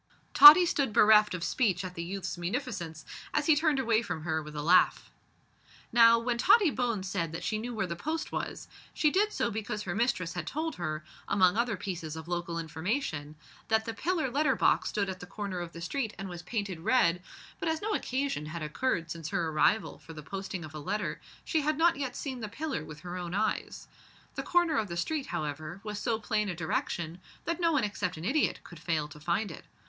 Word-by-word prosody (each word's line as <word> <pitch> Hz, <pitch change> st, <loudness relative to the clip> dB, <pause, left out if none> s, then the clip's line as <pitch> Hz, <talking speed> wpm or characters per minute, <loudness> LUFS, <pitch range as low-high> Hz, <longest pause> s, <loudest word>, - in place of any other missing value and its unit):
Tottie 310 Hz, +5 st, +11 dB
stood 275 Hz, -9 st, 0 dB
bereft 210 Hz, -3 st, +6 dB
of 170 Hz, -, -5 dB
speech 190 Hz, -6 st, +1 dB
at 180 Hz, -, -6 dB
the 170 Hz, -, -5 dB
youth's 190 Hz, +2 st, -4 dB
munificence, 175 Hz, -, -4 dB, 0.3 s
as -, -, +2 dB
he 315 Hz, -, +5 dB
turned 310 Hz, -1 st, +2 dB
away 230 Hz, -4 st, +2 dB
from 160 Hz, -9 st, -5 dB
her 160 Hz, -1 st, -1 dB
with 150 Hz, 0 st, -10 dB
a 150 Hz, -, -3 dB
laugh. 180 Hz, +4 st, +3 dB, 0.8 s
Now, 230 Hz, 0 st, +7 dB
when 235 Hz, +1 st, -1 dB
Tottie 390 Hz, -, +5 dB
Bones 230 Hz, -8 st, -1 dB
said 170 Hz, -3 st, -2 dB
that 165 Hz, +2 st, -5 dB
she 215 Hz, +4 st, -1 dB
knew 240 Hz, +2 st, -5 dB
where 215 Hz, -, 0 dB
the 170 Hz, -1 st, -4 dB
post 315 Hz, -, -3 dB
was, -, -, -4 dB, 0.3 s
she 300 Hz, -, +3 dB
did 415 Hz, +5 st, +2 dB
so 235 Hz, -, -1 dB
because 210 Hz, 0 st, -4 dB
her 175 Hz, -, -3 dB
mistress 195 Hz, -6 st, 0 dB
had 175 Hz, -, -5 dB
told 320 Hz, +3 st, -3 dB
her, 155 Hz, -3 st, -3 dB, 0.2 s
among 185 Hz, -2 st, +4 dB
other 235 Hz, -2 st, 0 dB
pieces 170 Hz, -5 st, -5 dB
of 160 Hz, 0 st, -8 dB
local 175 Hz, -1 st, -3 dB
information, 160 Hz, -, -3 dB, 0.3 s
that 220 Hz, 0 st, +2 dB
the 225 Hz, -, -4 dB
pillar 315 Hz, +1 st, -1 dB
letter 280 Hz, -1 st, +2 dB
box -, -, +2 dB
stood 200 Hz, -2 st, -1 dB
at 190 Hz, -1 st, -5 dB
the 180 Hz, -, -9 dB
corner 195 Hz, -2 st, -5 dB
of 175 Hz, -1 st, -5 dB
the 170 Hz, -, -9 dB
street 220 Hz, +5 st, -3 dB
and 195 Hz, -, -5 dB
was 175 Hz, -2 st, -7 dB
painted 195 Hz, -2 st, -3 dB
red; 175 Hz, -3 st, +2 dB, 0.4 s
but 330 Hz, -, -1 dB
as 320 Hz, 0 st, 0 dB
no 430 Hz, +1 st, -2 dB
occasion 260 Hz, -, -2 dB
had 155 Hz, +1 st, -5 dB
occurred 165 Hz, +1 st, -1 dB
since 165 Hz, -2 st, -5 dB
her 175 Hz, -5 st, -1 dB
arrival 190 Hz, +7 st, +1 dB
for 165 Hz, -, -12 dB
the 150 Hz, -1 st, -9 dB
posting 190 Hz, +1 st, -5 dB
of 155 Hz, -, -11 dB
a 155 Hz, -, -6 dB
letter, 155 Hz, -1 st, -3 dB, 0.2 s
she 315 Hz, -, +1 dB
had 300 Hz, +1 st, 0 dB
not 335 Hz, +1 st, +4 dB
yet 265 Hz, -3 st, -4 dB
seen 265 Hz, -3 st, -5 dB
the 215 Hz, -2 st, -5 dB
pillar 285 Hz, -, -4 dB
with 155 Hz, -1 st, -10 dB
her 180 Hz, +1 st, -6 dB
own 175 Hz, 0 st, -4 dB
eyes. 215 Hz, +1 st, -2 dB, 0.5 s
The -, -, -3 dB
corner 345 Hz, -4 st, +2 dB
of 215 Hz, -, -2 dB
the 170 Hz, -1 st, -5 dB
street, 290 Hz, -, -2 dB
however, 155 Hz, +4 st, -4 dB
was 210 Hz, -1 st, -5 dB
so 230 Hz, -1 st, 0 dB
plain 210 Hz, -1 st, -1 dB
a 180 Hz, -, -3 dB
direction 170 Hz, +1 st, -3 dB, 0.2 s
that 335 Hz, +1 st, -2 dB
no 335 Hz, -1 st, +3 dB
one 295 Hz, -6 st, +2 dB
except 200 Hz, -4 st, -2 dB
an 160 Hz, -, -7 dB
idiot 280 Hz, +8 st, +1 dB
could 175 Hz, -, -12 dB
fail 155 Hz, -2 st, -1 dB
to 150 Hz, -, -12 dB
find 175 Hz, +6 st, -1 dB
it. 160 Hz, -, -11 dB
200 Hz, 220 wpm, -30 LUFS, 170-250 Hz, 0.8 s, Tottie